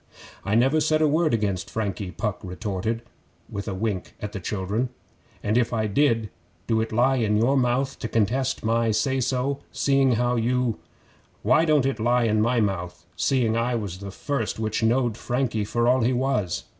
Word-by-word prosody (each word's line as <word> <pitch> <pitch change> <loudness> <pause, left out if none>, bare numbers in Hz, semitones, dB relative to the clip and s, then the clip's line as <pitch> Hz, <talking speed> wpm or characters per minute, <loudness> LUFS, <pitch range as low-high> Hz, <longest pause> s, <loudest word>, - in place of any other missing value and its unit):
'I 105 - +1
never 135 +7 +4
said 155 +1 +2
a 155 - +4
word 155 +1 +2
against 105 -5 -1
Frankie,' 100 -3 -3
Puck 105 +4 -3
retorted, 105 +4 -3 0.4
with 100 -2 -6
a 100 - -3
wink 100 -2 -3
at 105 - -5
the 100 - -5
children. 105 +6 -2 0.5
'An' 105 +3 +1
if 120 -1 +1
I 110 -2 0
did, 115 -1 +1 0.3
do 110 -1 +1
it 115 - -3
lie 125 +4 +3
in 105 -3 +1
your 120 +6 +3
mouth 130 +1 +1
to - - -3
contest 115 +4 0
my 115 0 +2
say 130 +5 +1
so, 130 +2 0
seeing 135 -2 +2
how 120 +1 +1
you 120 0 0 0.3
' - - -33
'Why 160 +1 +4
don't 150 -4 +3
it 135 -4 -1
lie 120 +2 +2
in 110 -1 +2
my 120 +2 +2
mouth, 95 -5 -2
seeing 120 -5 +1
I 120 +1 0
was 100 -5 -4
the 100 0 -7
first 115 +3 -3
which 110 0 -1
knowed 120 0 +2
Frankie 120 -5 -1
for 120 +3 0
all 130 +1 +4
he 120 +3 +2
was? 125 -9 0
115 Hz, 190 wpm, -25 LUFS, 105-130 Hz, 0.5 s, never